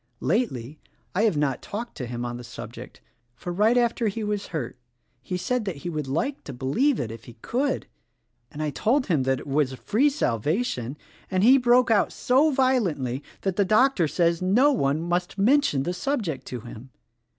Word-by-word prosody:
Lately, 155 - -1 0.3
I 205 +5 +2
have 200 -9 +2
not 140 -3 0
talked 235 +4 -6
to 125 -5 -4
him 120 0 -4
on 120 0 -4
the 125 - -9
subject; 120 0 -10 0.3
for 175 +8 -6
right 215 +6 +3
after 235 -1 +2
he 215 +2 -3
was 210 -1 -2
hurt 130 -8 -4 0.5
he 180 +8 -4
said 240 +7 -1
that 190 -4 -3
he 175 - -2
would 150 -3 -3
like 250 - -2
to 140 - -6
believe 215 - +1
it 110 - -3
if 115 0 -10
he 120 - -11
could, 265 +3 -1 0.7
and 155 - -5
I 150 - -1
told 240 - +1
him 160 -8 +1
that 130 -1 +1
it - - -11
was 140 -1 +1
a - - -8
free 245 - +2
salvation, 145 - -1 0.3
and 185 0 +1
he 260 +4 +7
broke 245 -1 +4
out 210 - +3
so 270 +5 +3
violently 200 - +1 0.2
that 190 -2 -2
the 205 - +4
doctor 215 -3 +3
says 170 +2 +1
no 235 +11 +4
one 150 - 0
must 175 +2 -2
mention 220 - +3
the 175 - -2
subject 200 - -2
to 125 -2 -5
him. 120 +2 -11
180 Hz, 195 wpm, -25 LUFS, -, 0.7 s, he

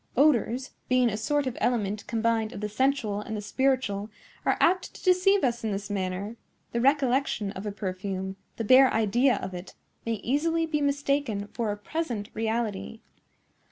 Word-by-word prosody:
Odors, 260 -2 +3 0.2
being 255 -2 +4
a - - -2
sort 290 +6 0
of 255 -2 -3
element 210 -4 0
combined 230 -1 0
of - - -6
the 210 - -1
sensual 220 -3 0
and 220 +1 -5
the - - -3
spiritual, 215 -3 0 0.4
are - - +3
apt 365 +1 +2
to - - -12
deceive 370 0 +4
us 240 -3 0
in 220 - -1
this 200 +1 -4
manner. 195 +3 -3 0.3
The 235 - -1
recollection 265 -6 +2
of 200 +1 -6
a - - -2
perfume, 190 -1 -4 0.2
the 230 - -2
bare 260 +4 +7
idea 240 +4 +3
of 190 - -5
it, 180 +1 -8 0.3
may 230 - -1
easily 320 +9 0
be 305 -2 -1
mistaken 280 -7 0
for 225 -3 -1
a 205 - -4
present 230 -3 -3
reality." 225 -1 -2
230 Hz, 170 wpm, -27 LUFS, 205-275 Hz, 0.4 s, bare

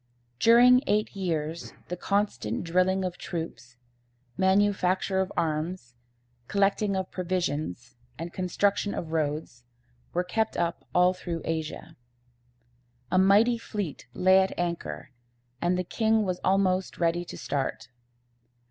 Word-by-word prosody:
During 245 - +7
eight 210 0 +1
years 165 -3 -3 0.2
the 180 - -2
constant 180 - -1
drilling 185 +2 +1
of 180 -1 -5
troops, 145 -7 -6 0.6
manufacture 190 0 +2
of 190 - -3
arms, 155 -4 -2 0.5
collecting 200 0 +1
of 190 -1 -3
provisions, 150 - -3 0.2
and 170 +2 -6
construction 200 +2 0
of 160 - -5
roads, 150 -5 -2 0.5
were 180 - 0
kept 220 +5 -1
up 170 0 -2
all 180 +1 +5
through 170 -3 -5
Asia. 160 0 -4 1.1
A 185 - +4
mighty 210 +5 +5
fleet 205 - -5
lay 185 +1 +5
at 190 0 0
anchor, 135 - -4 0.5
and 175 +1 +1
the 180 - 0
king 220 +3 +1
was 185 -2 -2
almost 190 -1 +1
ready 170 0 +1
to - - -9
start. 135 -2 -3
180 Hz, 120 wpm, -27 LUFS, 165-195 Hz, 1.1 s, During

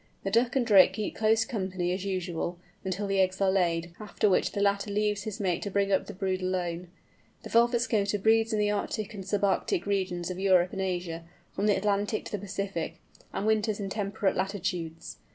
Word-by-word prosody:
The 195 - -2
duck 235 +3 +2
and 260 -3 +2
drake 195 -4 +7
keep 210 +1 -3
close 220 0 +3
company 185 -5 -2
as 185 +1 -3
usual, 180 -2 -2 0.3
until 190 +2 -2
the 195 -1 0
eggs 185 0 +2
are 195 -1 +3
laid, 170 -3 0
after 210 0 0
which - - +2
the - - -2
latter 200 0 +1
leaves 210 0 0
his 215 0 -5
mate 180 -4 0
to 205 - -3
bring 200 0 +1
up 190 - +2
the - - -6
brood 190 0 -1
alone. 180 -1 -2 0.6
The - - -8
Velvet 235 +1 +4
Scoter 205 -4 +1
breeds 225 +2 +3
in 215 - +1
the 210 0 +2
Arctic 215 +1 -3
and 195 -2 -6
sub 200 +1 -1
Arctic 270 - +1
regions 185 -3 -1
of 180 - -5
Europe 185 -2 +3
and 195 - -3
Asia, 175 -3 -3 0.3
from 205 - -1
the 205 - +4
Atlantic 205 +2 0
to - - -8
the 210 - -2
Pacific, 195 -3 -4 0.3
and 200 - -3
winters 215 -1 +1
in 195 -1 -4
temperate 200 -1 -1
latitudes. 180 -4 -3
195 Hz, 205 wpm, -28 LUFS, 185-210 Hz, 0.6 s, drake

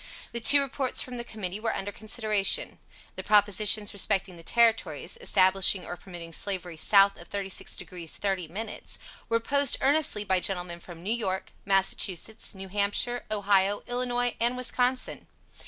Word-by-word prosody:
The 235 - -4
two 280 +5 +6
reports 270 -1 -2
from 250 -1 -2
the 240 - -5
Committee 205 -4 -6
were 225 +1 -2
under 200 +1 -4
consideration. 215 - +2 0.4
The - - -5
propositions 210 0 +3
respecting 195 -2 +1
the 170 - -11
Territories, 230 - +1
establishing 190 - +4
or 175 - -6
permitting 175 -2 -10
Slavery 185 -3 -3
south 195 +3 +4
of 170 - -12
36 195 -2 -4
degrees 175 -3 -7
30 190 -4 -2
minutes, 210 +6 -6 0.3
were 230 - +2
opposed 280 +3 +2
earnestly 280 -6 +2
by 190 -2 +1
gentlemen 180 -2 -2
from 170 -1 -12
New 210 +4 -1
York, 190 -5 -3
Massachusetts, 195 +1 0
New 190 0 -9
Hampshire, 205 +5 0
Ohio, 205 -1 +1
Illinois 245 0 -2
and 240 +2 0
Wisconsin. 255 0 -1
205 Hz, 150 wpm, -27 LUFS, 190-235 Hz, 0.4 s, two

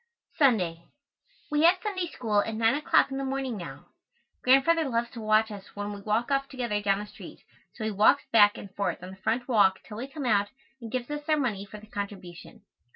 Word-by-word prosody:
Sunday. 180 - +2 0.6
We 300 0 +2
have 350 +2 +6
Sunday 375 -4 -2
School 215 -9 0
at 225 +1 -4
nine 225 +1 +3
o'clock 290 -1 +2
in 270 - -3
the - - -2
morning 270 -2 -2
now. 175 -5 -8 0.6
Grandfather 275 +4 +4
loves 235 -1 -1
to 235 - -8
watch 215 +1 +2
us 200 -2 -10
when 205 0 -4
we 200 - -8
walk 220 +6 -1
off 275 0 0
together 240 -6 -2
down 200 -1 +2
the 205 - -5
street, 205 - -13 0.3
so 225 - -6
he 215 - -1
walks 215 +8 +4
back 205 -2 +6
and 195 -2 -10
forth 200 -2 -2
on 185 - -8
the - - -10
front 225 +6 -1
walk 205 -6 +4
till 210 - -10
we 250 +4 -5
come 280 0 -6
out, 205 -4 +2 0.3
and 230 -2 -8
gives 255 +2 -3
us 295 +1 -5
our 310 - +4
money 210 -8 -2
for 210 - -10
the 210 - -14
contribution. 200 -4 -8
225 Hz, 220 wpm, -27 LUFS, 205-270 Hz, 0.6 s, have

